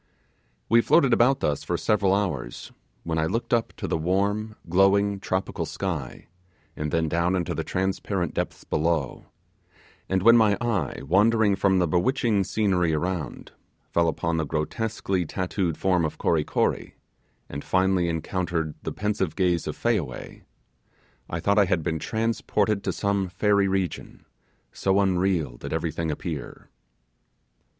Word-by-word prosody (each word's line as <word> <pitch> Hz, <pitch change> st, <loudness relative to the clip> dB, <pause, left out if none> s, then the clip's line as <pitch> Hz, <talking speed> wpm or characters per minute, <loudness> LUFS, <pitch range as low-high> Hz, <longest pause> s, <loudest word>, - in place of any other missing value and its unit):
We 115 Hz, 0 st, +5 dB
floated 135 Hz, -1 st, +4 dB
about 130 Hz, +4 st, +3 dB
thus 75 Hz, -1 st, 0 dB
for -, -, -1 dB
several 100 Hz, -3 st, +2 dB
hours, 80 Hz, -12 st, -2 dB, 0.3 s
when 80 Hz, -1 st, -1 dB
I 80 Hz, -, +1 dB
looked 115 Hz, +6 st, -2 dB
up 115 Hz, -1 st, +1 dB
to -, -, -4 dB
the -, -, -1 dB
warm, 100 Hz, +5 st, 0 dB
glowing, 95 Hz, +3 st, +3 dB
tropical 95 Hz, 0 st, -2 dB
sky, 85 Hz, -10 st, -4 dB, 0.5 s
and 75 Hz, 0 st, -3 dB
then 80 Hz, +1 st, 0 dB
down 85 Hz, +4 st, +1 dB
into 90 Hz, -2 st, -1 dB
the -, -, -3 dB
transparent 95 Hz, -2 st, -2 dB
depths -, -, -3 dB
below; 80 Hz, -3 st, -1 dB, 0.8 s
and 95 Hz, -1 st, +1 dB
when 115 Hz, +1 st, +8 dB
my 110 Hz, -4 st, +4 dB
eye, 110 Hz, -, -2 dB
wandering 105 Hz, +5 st, +3 dB
from 95 Hz, -1 st, +2 dB
the 90 Hz, -1 st, +2 dB
bewitching 105 Hz, -, +1 dB
scenery 90 Hz, -7 st, +1 dB
around, 85 Hz, -1 st, -4 dB, 0.4 s
fell 85 Hz, 0 st, +2 dB
upon 80 Hz, +1 st, -1 dB
the 80 Hz, -, +1 dB
grotesquely 95 Hz, +5 st, -2 dB
tattooed 90 Hz, 0 st, -2 dB
form 90 Hz, -2 st, +2 dB
of 80 Hz, -, -2 dB
Kory 80 Hz, -3 st, +1 dB
Kory, -, -, -1 dB, 0.5 s
and 70 Hz, -, -6 dB
finally, 95 Hz, -2 st, +2 dB
encountered 80 Hz, -1 st, -2 dB
the -, -, -4 dB
pensive 105 Hz, -6 st, -2 dB
gaze 90 Hz, -3 st, +1 dB
of -, -, -4 dB
Fayaway, -, -, -2 dB, 0.9 s
I 85 Hz, -, -3 dB
thought 100 Hz, +5 st, +2 dB
I 100 Hz, -, +5 dB
had 90 Hz, -3 st, 0 dB
been 80 Hz, -1 st, -1 dB
transported 110 Hz, -1 st, 0 dB
to -, -, +1 dB
some 100 Hz, -2 st, 0 dB
fairy 100 Hz, +2 st, +2 dB
region, 95 Hz, -2 st, -3 dB, 0.5 s
so 95 Hz, 0 st, +1 dB
unreal 90 Hz, -9 st, +1 dB
did -, -, -7 dB
everything 80 Hz, 0 st, -2 dB
appear. 75 Hz, -, -6 dB
95 Hz, 145 wpm, -25 LUFS, 80-100 Hz, 0.9 s, when